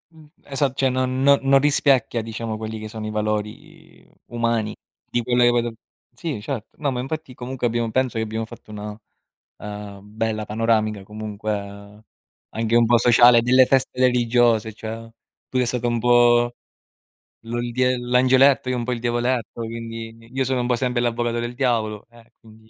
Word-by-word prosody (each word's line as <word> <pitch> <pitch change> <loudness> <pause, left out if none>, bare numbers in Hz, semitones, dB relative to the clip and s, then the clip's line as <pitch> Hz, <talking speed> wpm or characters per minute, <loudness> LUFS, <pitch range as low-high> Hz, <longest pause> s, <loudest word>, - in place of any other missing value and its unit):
Mh, 155 -1 -16 0.3
esat 135 -1 +1
cioè 135 -1 +3
non 130 0 0 0.2
no 140 0 +7 0.2
non 135 - +7
rispecchia 135 -5 +2
diciamo 110 0 -5
quelli 110 0 -6
che 110 - -6
sono 110 0 -7
i - - -3
valori 105 0 -5 0.2
umani 115 -2 -1 0.3
di 120 - -1
quelle 120 0 +2
che 120 - +5
vedo 120 -1 0 0.4
sì, 150 -11 -4
certo. 125 -3 -5
No, 145 - 0
ma 125 - -3
infatti 145 +1 -5
comunque 125 0 -3
abbiamo 115 -1 -1
penso 130 -2 0
che 110 - 0
abbiamo 110 +1 -4
fatto 110 - -13
una, 105 +1 -7 0.6
ehm, 105 -1 -8
bella 110 -1 -1
panoramica, 110 -1 0
comunque 105 0 -6 0.5
anche 115 +1 0
un 120 - +5
po' 120 +1 +4
sociale 120 0 +6
delle 130 +2 +5
feste 130 0 0
religiose; 120 -3 +2
cioè: 115 +1 -7 0.4
tu 130 - -5
sei 125 -1 +2
stato 120 0 -1
un 120 0 0
po' 120 0 +4 0.9
l'ol 120 +1 -3
diel 125 0 +1
l'angioletto, 130 +2 +4
io 130 - 0
un 120 - -2
po' 125 - -3
il 120 - -2
diavoletto, 120 -1 -1
quindi 115 0 -7
io 135 0 0
sono 130 0 -1
un 120 - -2
po' 125 - +2
sempre 125 0 -1
l'avvocato 120 0 -1
del 120 +1 -4
diavolo, 115 -5 -1
eh, 120 0 -20
quindi 110 0 -19
120 Hz, 175 wpm, -22 LUFS, 110-125 Hz, 0.9 s, no